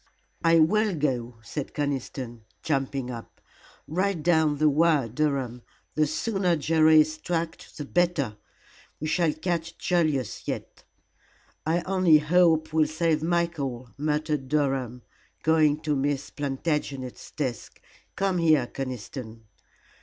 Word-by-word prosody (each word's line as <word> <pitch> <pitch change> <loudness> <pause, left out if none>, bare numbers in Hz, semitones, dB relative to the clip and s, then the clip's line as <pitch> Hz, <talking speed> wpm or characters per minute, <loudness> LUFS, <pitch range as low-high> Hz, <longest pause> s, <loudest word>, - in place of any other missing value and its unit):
"I 165 0 +5
will 205 +5 +3
go," 125 -5 -1
said 145 +4 -6
Conniston, 130 -4 -3 0.2
jumping 135 -3 -1
up. 115 -2 -9 0.5
"Write 185 +1 -1
down 160 -3 +3
the 155 +1 +3
wire, 150 -3 +3
Durham. 130 -1 -1 0.3
The 155 -1 +2
sooner 185 +2 0
Jerry 155 0 +5
is 155 +1 -2
tracked 165 -1 -4
the 150 - -5
better. 165 -9 +1 0.6
We 155 - -4
shall 165 0 +2
catch 165 +1 -3
Julius 155 - 0
yet." - - -5 0.8
"I 170 +2 +2
only 185 -4 +5
hope 160 0 +3
we'll 155 -1 +4
save 155 0 0
Michael," 155 -8 -1
muttered 150 -1 -1
Durham, 135 -5 0 0.4
going 155 -2 +3
to 150 -2 0
Miss 140 0 -1
Plantagenet's 140 -2 -3
desk. 130 -6 -4 0.4
"Come 195 -2 0
here, 155 -6 +4
Conniston." 125 -3 -6
155 Hz, 120 wpm, -26 LUFS, 135-165 Hz, 0.8 s, I